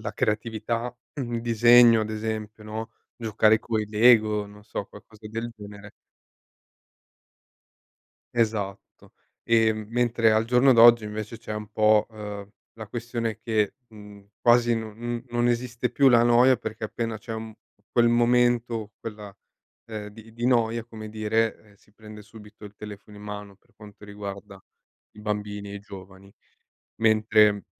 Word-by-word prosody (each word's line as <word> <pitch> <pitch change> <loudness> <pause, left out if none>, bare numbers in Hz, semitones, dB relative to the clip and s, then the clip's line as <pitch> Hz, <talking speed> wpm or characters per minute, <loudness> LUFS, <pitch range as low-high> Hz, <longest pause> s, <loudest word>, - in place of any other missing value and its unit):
la 100 - -5
creatività, 115 +2 -2 0.2
un 120 -5 -3
disegno 120 0 +6
ad 110 - -5
esempio, 110 0 -5
no, 110 +1 -6 0.3
giocare 110 -1 +3
coi 110 -1 -2
lego, 110 -2 +4
non 105 0 -15
so 105 -1 -5
qualcosa 105 +1 -15
del 115 +2 -5
genere. 105 0 -11 2.5
Esatto. 105 -4 -3 0.3
E 115 -1 +3
mentre 115 +1 +1
al 110 +1 +2
giorno 125 +3 +4
d'oggi 115 -1 +7
invece 110 +1 -6
c'è 115 -2 -7
un 105 0 -6
po', 110 0 +3
uhm, 105 -2 -8 0.3
la 110 -2 -9
questione 115 -1 -4
che, 110 -2 -1
mh, 105 -2 -14 0.2
quasi 120 0 +4
non 110 -2 -6
n 120 +1 -4
non 120 0 0
esiste 120 0 -1
più 135 +2 +4
la 120 -2 +5
noia 120 +2 +5
perché 110 0 -8
appena 115 +1 -4
c'è 110 +2 -8
un 110 0 -7 0.4
quel 120 -1 +4
momento, 120 -2 +2
quella 105 -2 -8 0.5
ehm, 110 -2 -7
di 110 +1 -15
di 120 +2 -3
noia 115 -2 +1
come 110 -2 -9
dire, 110 0 -2
eh, - - -24
si 105 - -28
prende 105 0 -12
subito 105 0 -15
il 105 0 -12
telefono 105 0 -11
in 105 - -12
mano 105 -1 -8
per - - -34
quanto 105 -1 -14
riguarda 100 -1 -9 0.5
i - - -11
bambini 105 -1 -4
e - - -7
i 100 - -7
giovani. 95 -1 -13 0.7
Mentre 110 -2 +3
110 Hz, 145 wpm, -25 LUFS, 105-115 Hz, 2.5 s, d'oggi